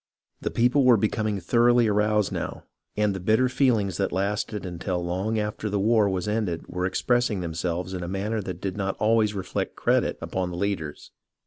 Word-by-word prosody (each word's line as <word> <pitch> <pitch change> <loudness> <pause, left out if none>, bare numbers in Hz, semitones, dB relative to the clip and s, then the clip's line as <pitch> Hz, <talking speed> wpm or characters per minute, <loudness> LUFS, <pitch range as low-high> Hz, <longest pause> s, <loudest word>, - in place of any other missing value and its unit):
The - - -1
people 125 +4 +3
were 125 -2 +6
becoming 110 0 0
thoroughly 120 +5 +4
aroused 105 -1 +2
now, - - -4 0.3
and 105 -1 +2
the 95 - -4
bitter 110 +7 +3
feelings 115 - +1
that - - 0
lasted 100 +2 -2
until 90 0 -3
long 95 +6 -1
after 105 0 -2
the 100 0 0
war 110 0 +3
was 95 0 -2
ended 105 -6 -1
were 90 0 -2
expressing 120 0 +1
themselves 85 +2 -3
in 90 - -4
a 85 - -4
manner 105 +4 -2
that 90 -3 -6
did 95 -2 -3
not 100 -1 -2
always 110 -1 +2
reflect 95 -2 -3
credit - - +1
upon 95 -1 -3
the 85 - -6
leaders. 90 -6 -3
100 Hz, 185 wpm, -25 LUFS, 90-110 Hz, 0.3 s, were